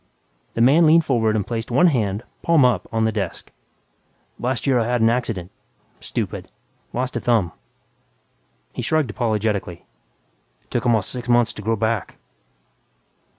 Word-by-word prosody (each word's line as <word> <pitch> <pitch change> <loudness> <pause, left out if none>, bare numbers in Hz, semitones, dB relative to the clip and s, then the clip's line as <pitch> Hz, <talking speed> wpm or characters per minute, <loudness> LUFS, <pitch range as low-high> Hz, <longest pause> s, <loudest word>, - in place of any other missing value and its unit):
The 115 - 0
man 150 +7 +6
leaned 165 +1 +5
forward 110 -5 +1
and 105 -3 0
placed 115 -1 -4
one 130 +9 +4
hand, 110 - +1 0.2
palm 165 -5 +4
up, 120 -7 +1
on 110 0 +1
the 110 - +1
desk. 100 -5 -4 0.9
"Last 125 0 -2
year 130 -3 +3
I 115 - 0
had 125 0 +1
an 115 0 +4
accident... 110 -7 -2 0.5
stupid... - - -4 0.4
lost 125 +1 -3
a - - 0
thumb." 110 -8 +1 1.2
He - - -4
shrugged 155 -7 0
apologetically, 105 -6 -2 0.8
"It - - -38
took 120 +1 -1
almost 110 -5 +2
six 125 -1 -6
months 120 -2 +3
to - - -8
grow 110 +2 0
back." 110 -2 -2
115 Hz, 150 wpm, -22 LUFS, 110-125 Hz, 1.2 s, man